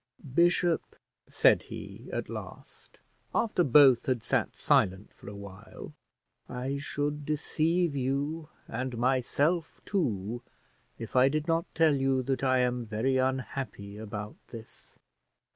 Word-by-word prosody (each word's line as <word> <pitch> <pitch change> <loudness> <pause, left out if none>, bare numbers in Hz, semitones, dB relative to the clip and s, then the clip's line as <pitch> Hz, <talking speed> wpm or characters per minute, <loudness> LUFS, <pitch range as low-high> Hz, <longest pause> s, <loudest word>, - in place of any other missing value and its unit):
"Bishop," 175 +1 +2 0.3
said - - +4
he, - - -9
at - - -3
last, - - -10 0.4
after 210 -6 +2
both 135 -4 +6
had 125 -4 0
sat - - 0
silent 95 +2 +1
for - - -11
a 100 - -9
while, 100 -2 -10 0.6
"I 130 +3 -3
should 145 +1 -2
deceive 155 +2 0
you 140 +4 -2 0.2
and 130 -1 -4
myself 135 +7 +1
too, 120 - -1 0.6
if 115 - -8
I 130 +1 +6
did 155 +2 -2
not 165 0 +1
tell 160 -2 +4
you 135 -1 +1
that 135 +1 -2
I 130 -1 +3
am 125 -1 0
very 115 +5 0
unhappy 130 -6 -2
about 105 -1 -6
this. 115 -2 -12
130 Hz, 125 wpm, -29 LUFS, 120-150 Hz, 0.6 s, both